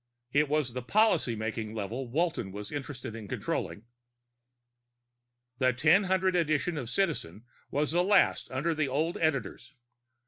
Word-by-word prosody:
It 145 +2 +2
was 145 -5 0
the 125 - -3
policy 205 - +2
making 110 0 -4
level 115 +5 -4
Walton 155 - -1
was 105 +1 -7
interested 135 -5 -6
in 110 -3 -8
controlling. 100 - -3 1.8
The 130 - +3
1000 185 +8 +3
edition 160 0 +1
of 130 -6 -4
Citizen 125 - -1 0.3
was 150 +1 0
the 175 +2 +3
last 200 +1 +3
under 145 +6 0
the 155 -2 0
old 155 +6 0
editors. 145 -3 -2
145 Hz, 135 wpm, -29 LUFS, 120-165 Hz, 1.8 s, The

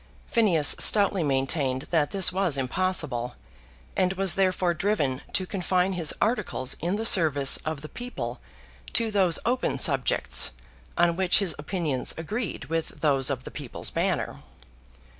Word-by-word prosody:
Phineas 185 - +4
stoutly 200 -3 +5
maintained 135 -2 -1
that 160 -4 +2
this 190 -2 0
was 185 -6 +1
impossible, 130 -4 -1 0.6
and 185 -1 +1
was 195 -1 +1
therefore 185 -2 +1
driven 170 -9 -1
to 190 - +1
confine 185 0 0
his 170 -4 -1
articles 200 - -1
in 175 +4 -1
the 220 +2 -3
service 150 -9 +4
of 155 -2 -3
the 155 - -7
people 245 +8 -6 0.5
to 230 -1 0
those 190 -5 +4
open 250 +2 0
subjects 135 - +2 0.4
on 170 0 +3
which 185 0 +2
his 195 -5 0
opinions 150 -4 -2
agreed 205 +6 -4
with 165 0 -4
those 135 -4 +3
of - - -3
the - - -9
People's - - -6
Banner. - - -1
175 Hz, 140 wpm, -26 LUFS, 145-195 Hz, 0.6 s, stoutly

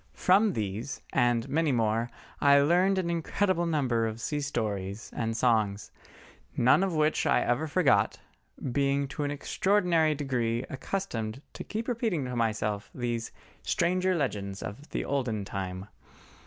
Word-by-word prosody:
From 200 +2 +4
these 110 +5 -4
and 120 -2 +2
many 160 0 +1
more 115 -1 +1 0.3
I 140 0 +6
learned 180 +6 +3
an 175 -2 0
incredible 175 +1 0
number 125 -8 +1
of 110 0 -5
sea 145 +5 -2
stories 105 -7 -3
and 115 -1 -2
songs, 110 -4 +1 0.7
none 125 +8 +5
of 190 -3 0
which 155 0 +2
I - - +4
ever 125 +7 0
forgot, 145 - +3 0.5
being 140 +1 +1
to 150 - -4
an - - -1
extraordinary 165 +1 +2
degree 125 -4 -1
accustomed 130 - -4
to - - -6
keep 220 +2 -4
repeating 225 - -1
to 125 0 -4
myself 110 -2 -1
these 120 -2 -3 0.3
"stranger 185 +2 +1
legends 100 - -2
of 115 +10 -8
the - - -3
olden 120 -7 -1
time." 95 -1 -5
135 Hz, 140 wpm, -29 LUFS, 115-165 Hz, 0.7 s, I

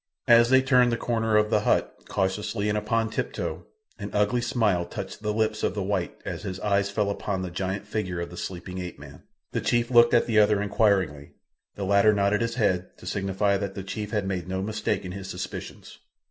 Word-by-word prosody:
As 120 0 +7
they 130 0 +5
turned 125 -2 +4
the 115 - 0
corner 115 -2 +1
of 105 0 +2
the - - +4
hut, - - 0
cautiously 100 +2 -1
and 105 - 0
upon 110 +1 0
tiptoe, - - -4 0.3
an 100 - -5
ugly 105 +4 +2
smile 110 -7 +1
touched - - -7
the 105 0 -1
lips 110 0 0
of - - 0
the 100 - -1
white 95 -2 -2
as - - -4
his 95 -1 -5
eyes 100 -1 +1
fell 100 0 0
upon 100 -2 -3
the 90 - -5
giant 95 +3 -3
figure 100 -5 -3
of 85 - -5
the - - -9
sleeping 90 +1 -6
ape 90 -1 -6
man. 70 -1 -12 0.3
The - - -1
chief 120 +1 +1
looked 120 0 +6
at 120 - +4
the 110 -2 +3
other 105 -1 +4
inquiringly. 100 -8 +1 0.4
The 100 - -4
latter 100 +2 +5
nodded 100 +1 +2
his 115 0 -1
head, 95 -6 0
to - - -14
signify 100 +1 0
that 100 -1 -4
the 95 - -5
chief 105 +2 -5
had 105 -3 -1
made 90 -3 -3
no 95 0 -2
mistake 105 -1 -2
in 90 - -5
his 95 0 -7
suspicions. - - -7
100 Hz, 215 wpm, -26 LUFS, 95-110 Hz, 0.4 s, As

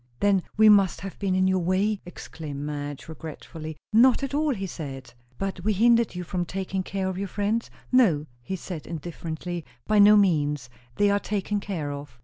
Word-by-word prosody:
"Then 200 -2 +3 0.2
we 220 0 +7
must 195 -5 +5
have 195 0 -7
been 190 -2 0
in 185 0 +3
your 190 0 +2
way," 190 +4 +1
exclaimed 155 -4 -7
Madge 145 -1 -5
regretfully. 160 0 -8 0.2
"Not 250 +4 +5
at 275 - -3
all," 295 -2 +1
he 195 -2 -4
said. 135 -8 -7 0.2
"But 195 -2 -4
we 215 +2 +2
hindered 230 0 +4
you 180 - -3
from 175 +1 -2
taking 190 +1 -3
care 190 0 -3
of 190 0 -3
your 200 - -2
friends?" 205 +4 -1 0.2
"No," 195 - +4 0.2
he 190 +10 -4
said 175 -4 -7
indifferently; 170 +1 -5 0.2
"by 215 -1 +3
no 210 +1 +8
means. 150 - +1 0.2
They 205 0 +3
are 200 - +2
taken 205 0 -2
care 170 -8 -4
of." 140 -3 -8
185 Hz, 185 wpm, -26 LUFS, 160-205 Hz, 0.2 s, no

